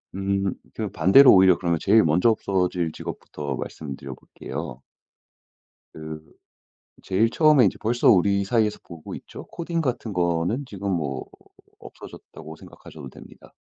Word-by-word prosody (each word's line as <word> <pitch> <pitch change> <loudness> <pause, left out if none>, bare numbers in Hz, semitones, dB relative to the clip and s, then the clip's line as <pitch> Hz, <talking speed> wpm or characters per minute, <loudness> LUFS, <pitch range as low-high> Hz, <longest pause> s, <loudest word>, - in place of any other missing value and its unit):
음 95 -1 -1 0.2
그 - - -4
반대로 100 +12 +6
오히려 95 -2 +5
그러면 85 -2 -1
제일 110 +2 +4
먼저 85 +8 +3
없어질 90 -6 -1
직업부터 70 -2 -7
말씀드려볼게요. 65 -3 -8 1.1
그 80 0 -8 0.8
제일 110 +5 +1
처음에 150 -2 +4
이제 95 - 0
벌써 120 +2 +2
우리 100 +1 +3
사이에서 105 +1 0
보고 85 -3 -11
있죠. - - -11
코딩 170 0 -4
같은 120 -6 -3
거는 90 +9 -1
지금 100 -4 -5
뭐 70 -7 -3 0.5
없어졌다고 80 +1 -12
생각하셔도 75 -3 -13
됩니다. - - -16
95 Hz, 310 characters per minute, -23 LUFS, 80-110 Hz, 1.1 s, 반대로